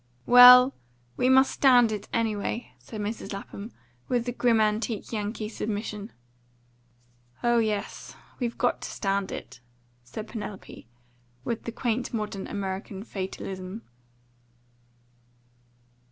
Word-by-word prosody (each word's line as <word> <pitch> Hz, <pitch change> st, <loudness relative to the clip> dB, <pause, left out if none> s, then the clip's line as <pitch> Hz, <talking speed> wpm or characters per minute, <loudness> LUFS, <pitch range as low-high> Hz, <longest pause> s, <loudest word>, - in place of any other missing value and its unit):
"Well, 250 Hz, +2 st, +9 dB, 0.4 s
we 255 Hz, -, +2 dB
must 265 Hz, +1 st, +5 dB
stand 245 Hz, -4 st, +5 dB
it, 210 Hz, -1 st, -5 dB
anyway," 225 Hz, +1 st, -2 dB
said 215 Hz, -2 st, -8 dB
Mrs. 210 Hz, +1 st, -4 dB
Lapham, 200 Hz, +2 st, -8 dB, 0.4 s
with 240 Hz, -2 st, 0 dB
the 245 Hz, -, -2 dB
grim 240 Hz, -2 st, +2 dB
antique 215 Hz, 0 st, -1 dB
Yankee 215 Hz, 0 st, -3 dB
submission. 210 Hz, 0 st, -5 dB, 1.3 s
"Oh 240 Hz, 0 st, +3 dB
yes, 215 Hz, -2 st, -3 dB, 0.2 s
we've 240 Hz, -2 st, -2 dB
got 245 Hz, -, 0 dB
to -, -, -5 dB
stand 195 Hz, -1 st, -2 dB
it," -, -, -8 dB, 0.4 s
said 210 Hz, -, -8 dB
Penelope, 205 Hz, -, -8 dB, 0.6 s
with 235 Hz, -1 st, -4 dB
the 230 Hz, -, -3 dB
quaint 240 Hz, 0 st, -2 dB
modern 210 Hz, -3 st, -4 dB
American 195 Hz, 0 st, -5 dB
fatalism. 190 Hz, 0 st, -6 dB
220 Hz, 110 wpm, -27 LUFS, 205-240 Hz, 1.3 s, Well